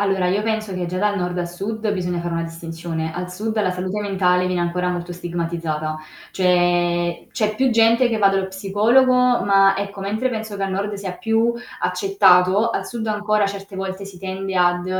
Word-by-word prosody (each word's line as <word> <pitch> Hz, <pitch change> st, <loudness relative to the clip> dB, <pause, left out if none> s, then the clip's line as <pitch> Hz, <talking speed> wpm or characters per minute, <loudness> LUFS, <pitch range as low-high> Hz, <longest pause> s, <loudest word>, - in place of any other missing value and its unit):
Allora, 195 Hz, -2 st, +1 dB
io 200 Hz, +3 st, +1 dB
penso 215 Hz, -2 st, -2 dB
che 180 Hz, -1 st, -2 dB
già 180 Hz, +1 st, -4 dB
dal 205 Hz, 0 st, +1 dB
nord 180 Hz, 0 st, -2 dB
a 175 Hz, -, -1 dB
sud 210 Hz, +5 st, -4 dB
bisogna 180 Hz, -3 st, -2 dB
fare 170 Hz, 0 st, -4 dB
una 165 Hz, 0 st, -1 dB
distinzione. 165 Hz, -1 st, -5 dB
Al 180 Hz, +1 st, -5 dB
sud, 215 Hz, +3 st, -2 dB
la 185 Hz, -3 st, +1 dB
salute 185 Hz, +3 st, -3 dB
mentale 185 Hz, -3 st, +1 dB
viene 180 Hz, -1 st, -1 dB
ancora 180 Hz, +1 st, -1 dB
molto 175 Hz, 0 st, -4 dB
stigmatizzata, 165 Hz, -3 st, -3 dB, 0.3 s
cioè 175 Hz, -1 st, +1 dB
c'è 215 Hz, -1 st, -1 dB
più 265 Hz, -1 st, +2 dB
gente 230 Hz, +2 st, +4 dB
che 225 Hz, -, 0 dB
va 200 Hz, -2 st, +4 dB
dallo 195 Hz, -1 st, 0 dB
psicologo, 205 Hz, +7 st, +3 dB
ma 200 Hz, -6 st, +4 dB
ecco, 200 Hz, 0 st, -5 dB
mentre 215 Hz, +6 st, -1 dB
penso 220 Hz, -3 st, -5 dB
che 195 Hz, -, -4 dB
al 195 Hz, -, -1 dB
nord 200 Hz, +2 st, -2 dB
sia 195 Hz, -2 st, -5 dB
più 225 Hz, +3 st, +1 dB, 0.3 s
accettato, 210 Hz, -, +3 dB
al -, -, -3 dB
sud 225 Hz, -2 st, -4 dB
ancora 210 Hz, 0 st, +1 dB
certe 195 Hz, 0 st, -8 dB
volte 190 Hz, 0 st, -5 dB
si 195 Hz, -2 st, -12 dB
tende 190 Hz, 0 st, -4 dB
ad, 175 Hz, 0 st, +2 dB
190 Hz, 190 wpm, -21 LUFS, 180-210 Hz, 0.3 s, gente